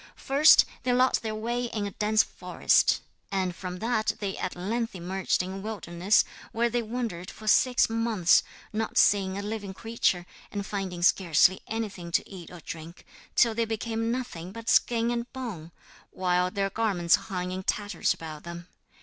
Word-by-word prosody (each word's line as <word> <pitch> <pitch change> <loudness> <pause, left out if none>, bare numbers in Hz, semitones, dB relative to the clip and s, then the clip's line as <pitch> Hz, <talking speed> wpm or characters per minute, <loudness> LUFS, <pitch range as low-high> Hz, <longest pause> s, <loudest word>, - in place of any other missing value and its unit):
First 285 +3 +6 0.2
they 250 0 +1
lost 255 +1 +3
their 220 -1 -3
way 240 +3 -2
in 215 -3 -3
a 200 - -4
dense 215 +2 +2
forest, - - +2 0.3
and 185 -3 -1
from 180 0 -6
that 220 +1 0
they 200 -2 -3
at 185 - -4
length 225 +5 -2
emerged 185 +1 -1
in 185 - -5
a - - -5
wilderness 195 -2 +1 0.3
where 235 +1 +1
they 240 +1 +1
wandered 220 -6 -4
for 215 - -11
six 250 +3 +4
months, 225 -6 +3 0.3
not 220 +1 -2
seeing 195 -2 +4
a 200 - -4
living 205 -2 -5
creature 225 -5 0 0.3
and 200 -1 -4
finding 190 -4 -4
scarcely 180 0 +4
anything 205 -6 -4
to - - +1
eat 185 -4 -10
or 175 -2 -11
drink, 165 +2 -9 0.3
till 230 -2 +4
they 230 +1 0
became 225 +1 -2
nothing 235 -9 -4
but 230 +2 -6
skin 235 0 +3
and 235 0 -3
bone, 205 -11 -6 0.4
while 180 -1 +1
their 195 0 -1
garments 190 -6 +1 0.2
hung 180 -2 -3
in 185 +1 -4
tatters 205 +2 0
about 155 -2 -5
them. 170 0 -8
205 Hz, 170 wpm, -27 LUFS, 180-230 Hz, 0.4 s, First